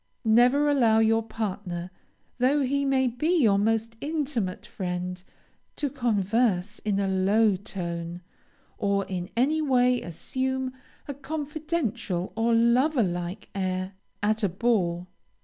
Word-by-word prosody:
Never 245 +6 +5
allow 240 -7 +4
your 225 0 +4
partner, 200 -5 -4 0.5
though 270 +4 +3
he 280 +2 0
may 265 -1 +2
be 305 +9 +1
your 200 -3 +4
most 225 +2 0
intimate 285 - -2
friend, 180 0 -4 0.5
to 285 -3 -2
converse 215 -4 0
in 205 -2 -1
a 200 - +1
low 195 +3 +3
tone, 175 -2 -5 0.6
or 200 -1 +1
in 180 -1 -4
any 300 +6 +2
way 250 -3 +3
assume 260 +10 -3 0.3
a 285 - -3
confidential 285 - -3
or 225 +1 +1
lover 245 +4 +3
like 175 0 -4
air 185 -1 -2 0.3
at 215 +1 +1
a 200 - +2
ball. 180 -3 0
225 Hz, 125 wpm, -26 LUFS, 185-260 Hz, 0.6 s, Never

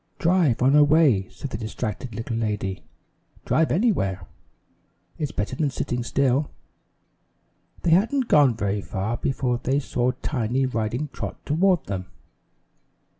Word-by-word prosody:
"Drive 165 -9 +2
on 135 +3 +5
a 150 - +7
way," 145 - +4
said 140 - -8
the 105 - -4
distracted 110 0 -5
little 115 +1 -4
lady. 105 -4 -2 0.6
"Drive 160 0 +2
anywhere. 100 - +1 0.9
It's 150 -3 -2
better 105 +5 -3
than 150 +1 0
sitting 125 -2 -3
still." 135 +3 +1 1.3
They 170 - +2
hadn't 230 +9 +3
gone 140 -6 +5
very 100 -2 -1
far 100 +5 -3
before 125 -3 -1
they 135 +3 +1
saw 125 -3 -1
Tiny 130 -1 0
riding 120 +4 -2
Trot - - -7
toward 175 +1 +2
them. 95 -2 -4
130 Hz, 130 wpm, -24 LUFS, 110-150 Hz, 1.3 s, a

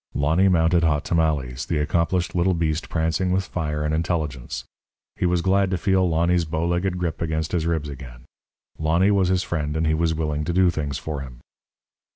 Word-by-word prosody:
Lonny 80 +7 +3
mounted 85 -1 +3
Hot 75 -2 +1
Tamales, 70 -6 0
the 85 - 0
accomplished 85 +4 0
little 90 +1 +2
beast 80 -1 -1
prancing 80 +3 0
with 95 +1 +1
fire 75 -4 -3
and 75 0 -1
intelligence. 80 -6 -2 0.5
He 90 - 0
was 90 -1 +1
glad 95 0 +2
to 95 - 0
feel 95 0 +2
Lonny's 85 +2 +2
bowlegged 85 +3 -1
grip 85 -3 -3
against 80 -1 -2
his 85 -2 0
ribs 80 -3 -1
again. 65 -4 -10 0.6
Lonny 85 +5 +3
was 95 -2 +3
his 95 0 +1
friend, 75 -2 -2
and 80 - 0
he 80 - +2
was 80 0 +1
willing 75 -2 -2
to 85 - -1
do 90 0 +4
things 70 -4 -3
for 75 +1 -5
him. 65 -3 -9
80 Hz, 190 wpm, -23 LUFS, 75-90 Hz, 0.6 s, do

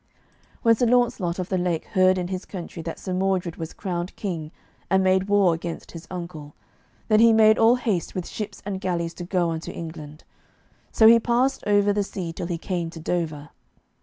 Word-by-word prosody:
When 230 - +6
Sir 235 +2 +1
Launcelot 235 -8 +1
of 185 -1 -4
the 185 - 0
Lake 175 -3 -1
heard 185 -2 +3
in 180 -1 -3
his 185 -1 -4
country 175 -3 -7
that 165 0 -6
Sir 185 - -5
Mordred 185 -2 -1
was 165 -1 -5
crowned 180 -2 -4
king, 165 -7 -4 0.4
and 190 +1 +3
made 190 +1 +2
war 200 -4 +4
against 165 +1 -6
his 165 -1 -10
uncle, 170 -5 -7 0.5
then 215 -1 +4
he 230 0 +7
made 220 0 +5
all 225 +2 +6
haste 215 -8 -2
with 180 -2 -3
ships 210 -2 -6
and 195 -2 -4
galleys 170 -3 -2
to 175 - -7
go 175 -1 0
unto 160 0 -5
England. 155 -2 -8 0.7
So 220 - +4
he 230 +1 +8
passed 245 +4 +1
over 205 0 +3
the 205 - +1
sea 180 -4 -5
till 170 - -5
he 175 -2 -2
came 175 -1 -3
to 165 - -10
Dover. 155 -3 -3
185 Hz, 195 wpm, -24 LUFS, 170-205 Hz, 0.7 s, he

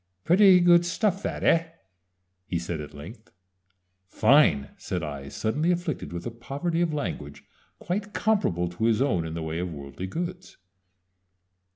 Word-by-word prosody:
"Pretty 185 +1 +6
good 175 -1 +6
stuff, 190 +2 0
that, - - -4
eh?" 165 0 +3 0.8
he 90 - -1
said, 85 -1 -4
at 75 0 -10
length. 75 0 -11 0.8
"Fine!" 95 - +4
said 90 -2 -4
I, 70 -3 -6
suddenly 150 - 0
afflicted 175 -4 -3
with 85 0 -6
a 120 - -3
poverty 140 +9 -3
of 170 -2 +1
language 75 - -5 0.3
quite 205 +4 -3
comparable 200 - +1
to 90 +6 -3
his 115 -1 +3
own 95 -12 +1
in 80 - -6
the 85 - -4
way 80 +1 -3
of 90 0 -3
worldly 70 +5 -7
goods. 175 - -6
120 Hz, 155 wpm, -26 LUFS, -, 0.8 s, Pretty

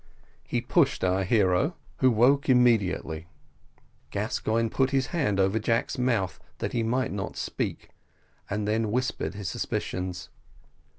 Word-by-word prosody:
He - - -1
pushed - - +2
our 95 +1 +2
hero, 100 - +2 0.2
who 130 - +4
woke 130 +5 +3
immediately 100 -10 +2 0.8
Gascoigne 115 +1 -1
put 130 +3 +1
his 135 -1 +1
hand 135 - +1
over 95 +3 +2
Jack's 115 +4 0
mouth, 115 -7 0 0.2
that - - -3
he 120 - +1
might 125 +3 0
not 95 -1 -4
speak, - - -4 0.6
and 105 0 -2
then 110 +1 +1
he 105 - -3
whispered 130 -2 -1
his 100 -2 -4
suspicions. 90 -1 -3
110 Hz, 135 wpm, -27 LUFS, 95-125 Hz, 0.8 s, who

